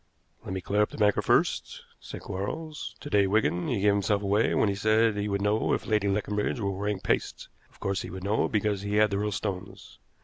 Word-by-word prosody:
"Let -, -, -5 dB
me 95 Hz, -, -3 dB
clear 105 Hz, +3 st, +1 dB
up 105 Hz, -, +2 dB
the -, -, -10 dB
banker 105 Hz, -1 st, +3 dB
first," -, -, +1 dB, 0.2 s
said -, -, -9 dB
Quarles. 150 Hz, +12 st, -5 dB
"To 145 Hz, -, -7 dB
day, 100 Hz, -1 st, +4 dB
Wigan, 95 Hz, -4 st, +1 dB
he 110 Hz, -5 st, -1 dB
gave 105 Hz, 0 st, +4 dB
himself 100 Hz, 0 st, 0 dB
away 100 Hz, +3 st, +2 dB
when -, -, +3 dB
he 100 Hz, -, +1 dB
said 110 Hz, +2 st, +2 dB
he 105 Hz, 0 st, -2 dB
would 100 Hz, 0 st, -1 dB
know 105 Hz, +2 st, +1 dB
if -, -, -1 dB
Lady 105 Hz, -2 st, +1 dB
Leconbridge 105 Hz, +3 st, -1 dB
were 100 Hz, -2 st, -1 dB
wearing 100 Hz, +1 st, -2 dB
paste. -, -, -2 dB, 0.2 s
Of -, -, -25 dB
course 100 Hz, -1 st, -1 dB
he -, -, -7 dB
would 95 Hz, -1 st, -7 dB
know, 105 Hz, +3 st, +1 dB
because 105 Hz, -2 st, 0 dB
he 100 Hz, +1 st, -2 dB
had 105 Hz, 0 st, +4 dB
the 100 Hz, -, 0 dB
real 105 Hz, 0 st, -1 dB
stones. 100 Hz, -2 st, -6 dB
105 Hz, 230 wpm, -27 LUFS, 100-105 Hz, 0.2 s, day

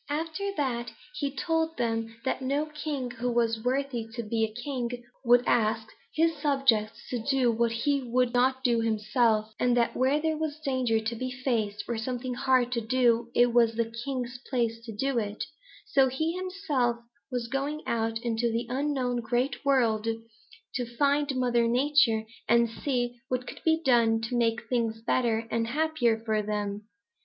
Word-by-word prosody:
"After 325 Hz, +7 st, -2 dB
that, 245 Hz, -4 st, -1 dB, 0.2 s
he 285 Hz, -, -2 dB
told 325 Hz, +3 st, -1 dB
them 225 Hz, -1 st, -1 dB
that 265 Hz, -, -1 dB
no 280 Hz, +3 st, 0 dB
king 300 Hz, -4 st, -4 dB
who 245 Hz, +1 st, -2 dB
was 230 Hz, -2 st, +1 dB
worthy 255 Hz, -2 st, -1 dB
to 235 Hz, -, -3 dB
be 220 Hz, 0 st, 0 dB
king 245 Hz, +1 st, -3 dB, 0.3 s
would 245 Hz, 0 st, +5 dB
ask 220 Hz, -1 st, +1 dB, 0.3 s
his 330 Hz, +1 st, +3 dB
subjects 270 Hz, -7 st, +1 dB
to 245 Hz, -, -1 dB
do 255 Hz, 0 st, +2 dB
what 230 Hz, 0 st, +1 dB
he 275 Hz, +5 st, +1 dB
would 250 Hz, 0 st, +1 dB
not 260 Hz, +1 st, +2 dB
do 240 Hz, -3 st, +3 dB
himself, 220 Hz, 0 st, +1 dB
and 245 Hz, -1 st, +3 dB
that 235 Hz, -, +2 dB
where 265 Hz, +4 st, +2 dB
there 315 Hz, 0 st, 0 dB
was 310 Hz, -1 st, -3 dB
danger 255 Hz, -4 st, +1 dB
to 220 Hz, +2 st, -3 dB
be 255 Hz, +3 st, -3 dB
faced 235 Hz, -5 st, -1 dB
or 235 Hz, -2 st, -2 dB
something 250 Hz, +2 st, -3 dB
hard 255 Hz, -1 st, +2 dB
to 235 Hz, -2 st, 0 dB
do, 235 Hz, 0 st, +2 dB
it 240 Hz, -1 st, +4 dB
was 230 Hz, -2 st, +4 dB
the 230 Hz, 0 st, -1 dB
king's 250 Hz, -2 st, -4 dB
place 230 Hz, -3 st, -1 dB
to 230 Hz, -, -6 dB
do 255 Hz, +4 st, 0 dB
it, 205 Hz, -1 st, -3 dB, 0.4 s
so 275 Hz, -11 st, +4 dB
he 315 Hz, +6 st, -1 dB
himself 360 Hz, -11 st, -1 dB, 0.3 s
was 245 Hz, -3 st, -2 dB
going 280 Hz, +4 st, -2 dB
out 225 Hz, -1 st, 0 dB
into 235 Hz, 0 st, 0 dB
the 230 Hz, +2 st, -1 dB
unknown 260 Hz, -2 st, 0 dB
Great 240 Hz, +5 st, -1 dB
World 230 Hz, -6 st, +2 dB, 0.7 s
to 240 Hz, -1 st, -4 dB
find 285 Hz, -1 st, +2 dB
Mother 240 Hz, -2 st, +2 dB
Nature 245 Hz, -2 st, +3 dB, 0.3 s
and 235 Hz, +1 st, +5 dB
see 245 Hz, 0 st, -2 dB
what 255 Hz, -1 st, -2 dB
could -, -, -9 dB
be 320 Hz, 0 st, +3 dB
done 230 Hz, -3 st, +4 dB
to 230 Hz, +2 st, -3 dB
make 235 Hz, -1 st, +1 dB
things 230 Hz, -3 st, 0 dB
better 230 Hz, -2 st, +1 dB
and 230 Hz, 0 st, 0 dB
happier 275 Hz, -4 st, +1 dB
for 220 Hz, -1 st, -1 dB
them. 210 Hz, 0 st, -3 dB
245 Hz, 170 wpm, -28 LUFS, 230-275 Hz, 0.7 s, would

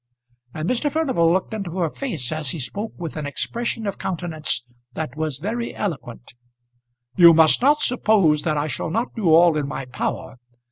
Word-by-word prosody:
And 155 Hz, +2 st, -3 dB
Mr. 255 Hz, +6 st, 0 dB
Furnival 260 Hz, -, +2 dB
looked 185 Hz, +4 st, 0 dB
into 195 Hz, -5 st, -5 dB
her 170 Hz, -4 st, 0 dB
face 165 Hz, -, -4 dB
as 155 Hz, -3 st, -3 dB
he 160 Hz, -, -4 dB
spoke 205 Hz, -, -5 dB
with 165 Hz, -3 st, -6 dB
an 150 Hz, -2 st, -3 dB
expression 230 Hz, -, -3 dB
of 200 Hz, -, -4 dB
countenance 160 Hz, -8 st, -2 dB, 0.3 s
that 155 Hz, -3 st, -5 dB
was 155 Hz, -3 st, -2 dB
very 230 Hz, +9 st, -4 dB
eloquent. 130 Hz, -, -5 dB, 0.8 s
"You 170 Hz, -2 st, +9 dB
must 160 Hz, +4 st, +5 dB
not 290 Hz, +4 st, +4 dB
suppose 200 Hz, -11 st, +3 dB
that 155 Hz, -3 st, -1 dB
I 145 Hz, -, 0 dB
shall 155 Hz, +2 st, -3 dB
not 225 Hz, +9 st, -2 dB
do 200 Hz, -8 st, +1 dB
all 165 Hz, 0 st, +6 dB
in 150 Hz, -2 st, -1 dB
my 135 Hz, -, -5 dB
power. 125 Hz, 0 st, -4 dB
165 Hz, 180 wpm, -22 LUFS, 150-215 Hz, 0.8 s, You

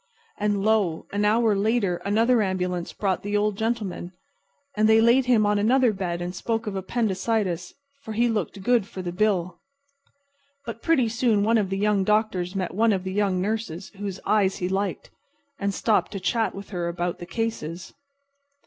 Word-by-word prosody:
And 205 Hz, -1 st, 0 dB
lo! 205 Hz, -7 st, +1 dB
an 205 Hz, +1 st, +1 dB
hour 220 Hz, 0 st, +3 dB
later 200 Hz, -3 st, +1 dB
another 225 Hz, +5 st, +2 dB
ambulance 180 Hz, -3 st, -2 dB
brought 195 Hz, -3 st, -1 dB
the 205 Hz, +1 st, -1 dB
Old 210 Hz, 0 st, +1 dB
Gentleman. 205 Hz, -5 st, -3 dB, 0.6 s
And 215 Hz, +1 st, +3 dB
they 220 Hz, 0 st, +6 dB
laid 240 Hz, +3 st, +4 dB
him 230 Hz, -4 st, +4 dB
on 205 Hz, 0 st, +2 dB
another 240 Hz, +2 st, +3 dB
bed 175 Hz, -3 st, -3 dB
and 175 Hz, +1 st, -4 dB
spoke 225 Hz, +4 st, -2 dB
of 210 Hz, -2 st, -4 dB
appendicitis, 190 Hz, -3 st, -1 dB, 0.3 s
for 220 Hz, -6 st, -7 dB
he 235 Hz, +3 st, +2 dB
looked 205 Hz, -3 st, -2 dB
good 235 Hz, -3 st, +2 dB
for 190 Hz, -4 st, -7 dB
the 175 Hz, -, -3 dB
bill. 185 Hz, -2 st, 0 dB, 1.1 s
But 230 Hz, -1 st, -6 dB
pretty 290 Hz, -8 st, +3 dB
soon 225 Hz, -2 st, +1 dB
one 225 Hz, +2 st, +3 dB
of 200 Hz, -3 st, -1 dB
the 195 Hz, -, -2 dB
young 205 Hz, -1 st, +2 dB
doctors 200 Hz, -3 st, 0 dB
met 185 Hz, -2 st, -2 dB
one 220 Hz, +2 st, +3 dB
of 190 Hz, -2 st, -2 dB
the 190 Hz, 0 st, -4 dB
young 195 Hz, -2 st, +1 dB
nurses 200 Hz, -3 st, -3 dB
whose 200 Hz, -1 st, -6 dB
eyes 200 Hz, -3 st, +2 dB
he 180 Hz, -, -2 dB
liked, 190 Hz, 0 st, -2 dB, 0.5 s
and 200 Hz, 0 st, 0 dB
stopped 215 Hz, +3 st, +1 dB
to 195 Hz, -, -3 dB
chat 225 Hz, +3 st, 0 dB
with 200 Hz, +1 st, -9 dB
her 175 Hz, -3 st, -2 dB
about 175 Hz, 0 st, -3 dB
the 175 Hz, -, -8 dB
cases. 185 Hz, -6 st, -4 dB
205 Hz, 180 wpm, -25 LUFS, 185-225 Hz, 1.1 s, they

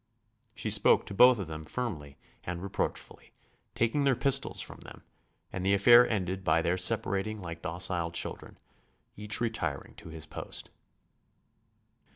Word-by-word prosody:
She -, -, -2 dB
spoke -, -, +4 dB
to -, -, -6 dB
both 125 Hz, +5 st, +7 dB
of 100 Hz, -, -4 dB
them 80 Hz, -1 st, -7 dB
firmly 75 Hz, -, -5 dB, 0.3 s
and 85 Hz, 0 st, -5 dB
reproachfully, 100 Hz, -, -4 dB, 0.4 s
taking 120 Hz, +5 st, +1 dB
their 135 Hz, -2 st, +3 dB
pistols 135 Hz, +2 st, +1 dB
from -, -, -4 dB
them, -, -, -13 dB, 0.5 s
and 95 Hz, -, -4 dB
the 100 Hz, +1 st, +3 dB
affair 120 Hz, +5 st, +7 dB
ended 95 Hz, -3 st, -2 dB
by 85 Hz, -3 st, +2 dB
their 85 Hz, +1 st, +1 dB
separating 105 Hz, +1 st, 0 dB
like 85 Hz, -3 st, -7 dB
docile 85 Hz, +1 st, 0 dB
children, 85 Hz, -, -5 dB, 0.6 s
each 105 Hz, +1 st, -2 dB
retiring 95 Hz, -, -3 dB
to -, -, -11 dB
his 80 Hz, -1 st, -7 dB
post. -, -, -8 dB
95 Hz, 145 wpm, -29 LUFS, 85-115 Hz, 0.6 s, both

